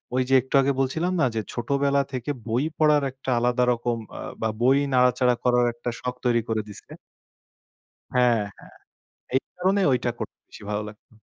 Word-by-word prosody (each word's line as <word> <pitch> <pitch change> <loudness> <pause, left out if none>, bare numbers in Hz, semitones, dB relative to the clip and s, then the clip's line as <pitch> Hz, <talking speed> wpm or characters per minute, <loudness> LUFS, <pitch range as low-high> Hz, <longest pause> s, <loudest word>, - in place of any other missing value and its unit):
ওই 130 - +3
যে - - +2
একটু 130 - -13
আগে 135 +1 +2
বলছিলাম 160 +7 0
না, - - +4
যে 110 - 0
ছোটবেলা 140 +3 +1
থেকে 130 +2 -2 0.2
বই 120 +4 +1
পড়ার 150 -2 +4
একটা 130 +1 -8
আলাদা 125 +1 +2
রকম, 120 0 -2 0.2
আ - - -7 0.2
বা 110 - +1
বই 130 +3 +5 0.2
নাড়াচাড়া 125 0 +4
করার 125 -1 +3
একটা 120 +1 -5
শখ 125 0 -4
তৈরি 120 -1 +3
করে 110 -1 0
দিছে। 105 - -13 1.2
হ্যাঁ, 120 -3 +3 0.2
হ্যাঁ। - - -16 0.6
এই 130 - +4 0.2
কারণে 190 +3 +2
ঐটা 125 -1 +1
করতে - - -6
বেশি - - -13
ভালো 105 0 -1
লাগতো। 105 +2 -16
125 Hz, 175 wpm, -25 LUFS, 120-135 Hz, 1.2 s, বই